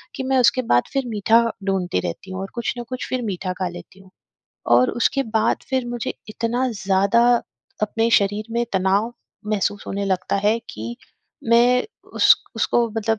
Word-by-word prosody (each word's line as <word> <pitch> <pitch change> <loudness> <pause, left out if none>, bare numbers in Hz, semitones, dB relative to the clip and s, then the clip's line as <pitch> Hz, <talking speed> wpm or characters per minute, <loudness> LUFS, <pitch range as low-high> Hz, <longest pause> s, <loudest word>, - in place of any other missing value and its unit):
कि 265 - -4
मैं 265 0 +1
उसके 255 +1 +4
बाद 120 - +4
फिर 270 -1 0
मीठा 225 +1 +3 0.2
ढूँढती 185 - 0
रहती 185 - -7
हूँ 185 - -4
और 195 - -5
कुछ 235 -2 -2
ना 240 - -4
कुछ 255 -1 -4
फिर 255 -1 -1
मीठा 185 -3 -3
खा 185 - 0
लेती 175 +2 -12
हूँ 190 -1 -18 0.7
और 125 +1 +4
उसके 275 +3 +1 0.2
बाद - - +2
फिर 260 -2 0
मुझे 240 -1 -4
इतना 230 +4 -1
ज़्यादा 200 +2 +2 0.6
अपने 225 +2 +1
शरीर 205 0 +2
में 235 +1 +1
तनाव 195 +4 +1 0.3
महसूस 205 -1 -1
होने 200 +1 -3
लगता 190 0 0
है, 210 +3 +2
कि 115 +2 -6 0.5
मैं 245 +2 +4 0.3
उस - - +7 0.2
उसको 235 -1 +2
मतलब 220 0 0
215 Hz, 175 wpm, -22 LUFS, 190-235 Hz, 0.7 s, उस